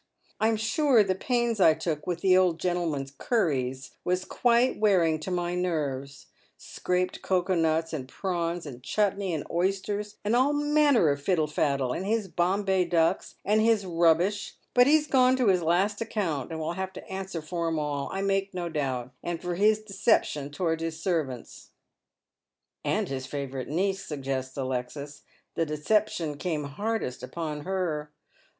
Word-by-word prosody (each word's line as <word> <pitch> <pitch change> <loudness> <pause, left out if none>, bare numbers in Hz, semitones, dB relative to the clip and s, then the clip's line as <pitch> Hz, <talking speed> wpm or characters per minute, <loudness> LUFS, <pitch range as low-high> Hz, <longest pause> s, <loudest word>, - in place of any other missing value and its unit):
I'm 220 +1 +3
sure 230 +2 +3
the 190 -2 0
pains 235 +2 0
I 160 -3 +6
took 160 -1 -3
with 175 -1 -2
the 185 -1 +5
old 180 -3 +3
gentleman's 165 -7 -1
cunies 135 - -1
was 180 +1 0
quite 240 0 +2
wearing 175 -7 +3
to 155 - -6
my 175 -1 -1
nei 160 -7 -1
ves 140 0 -13 0.2
— - - -37
scraped 180 0 -2
cocoa 185 0 +1
nuts, 165 -1 +1
and 130 -4 -4
prawns, 175 -1 -2
and 130 -4 -8
chutnee, 200 +5 0
and 155 -3 -3
oysters, 195 +3 -1
and 215 +3 +2
all 265 +4 +3
manner 295 - +3
of 140 0 -1
fiddle 160 0 +2
faddle, 140 -4 0
and 190 - -4
his 220 -1 0
Bombay 190 +1 +1
ducks, 170 +1 +1
and 215 +1 +3
his 220 -3 +3
rubbish 175 +4 +2
i, - - -43
but 245 0 +6
he's 300 +1 +5
gone 255 -3 +4
to 250 -5 +2
his 185 -2 +3
last 190 +6 +1
account, 180 - -2
and 160 -1 -5
will 160 +2 -2
have 190 +1 -4
to - - -10
answer 190 -2 -5
for 170 +2 -3
'em 165 -1 0
all, 145 -2 -2
I 195 +1 -2
make 195 -1 0
no 175 -1 -3
doubt, 130 -5 -2
and 170 -1 -3
for 180 -1 -3
his 215 +4 +3
deception 195 -8 +1
towards 165 +2 -1
his 165 -1 -3
servants." 155 -9 -3 1.1
"And - - 0
his 130 -1 -4
favourite 135 -3 -4
niece," 190 +5 0
suggests 135 -3 -4
Alexis. 130 +2 -4 0.3
"The 165 - 0
deception 155 0 0
came 155 -3 -2
hardest 175 - -3
upon 150 +2 -5
her." 175 -6 -2
175 Hz, 170 wpm, -27 LUFS, 150-200 Hz, 1.1 s, I